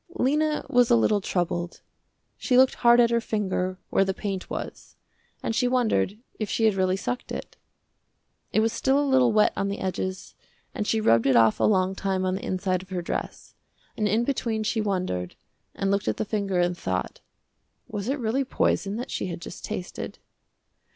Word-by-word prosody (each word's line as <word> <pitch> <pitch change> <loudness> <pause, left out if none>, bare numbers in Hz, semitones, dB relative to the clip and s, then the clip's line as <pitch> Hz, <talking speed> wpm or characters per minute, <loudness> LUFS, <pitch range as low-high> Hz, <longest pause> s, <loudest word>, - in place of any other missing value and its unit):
Lena 300 +1 +1
was 245 -1 +3
a - - +6
little 200 - +3
troubled. 175 -1 -2 0.5
She 250 - +1
looked 260 0 +6
hard 240 0 +6
at 235 -1 +5
her 235 0 +2
finger 185 -4 -2
where - - +4
the 190 -1 -2
paint 195 -3 -4
was, - - -7 0.5
and - - -1
she 250 - +2
wondered 225 - +1 0.2
if 215 - -2
she 225 - 0
had 220 - +4
really 190 -1 +1
sucked 245 +5 -4
it. - - -6 1.0
It 215 - +3
was 225 0 +1
still 270 +1 +2
a 290 - +1
little 260 -3 +4
wet 215 -1 +4
on 195 - -1
the 200 +1 -3
edges 185 0 -4 0.4
and 210 - -3
she 225 - +2
rubbed 115 - +3
it 130 - +4
off 115 -2 +5
a - - +3
long 190 -2 +2
time 190 -1 -1
on 185 - 0
the 190 - -4
inside 185 -1 -1
of 185 - -15
her 180 -2 -3
dress, - - -5 0.4
and 210 - 0
in 220 +4 +2
between 230 -4 -1
she 220 +1 0
wondered 180 - -2 0.4
and 195 0 0
looked 200 +1 0
at - - 0
the - - -1
finger 200 -3 -1
and 175 0 +1
thought, 95 - -3 0.7
was 210 +1 -4
it 280 - 0
really 245 +2 0
poison 205 -5 0
that 240 +3 -5
she - - -2
had 170 -2 -5
just 170 - -9
tasted. 180 - -5
200 Hz, 195 wpm, -26 LUFS, 185-235 Hz, 1.0 s, a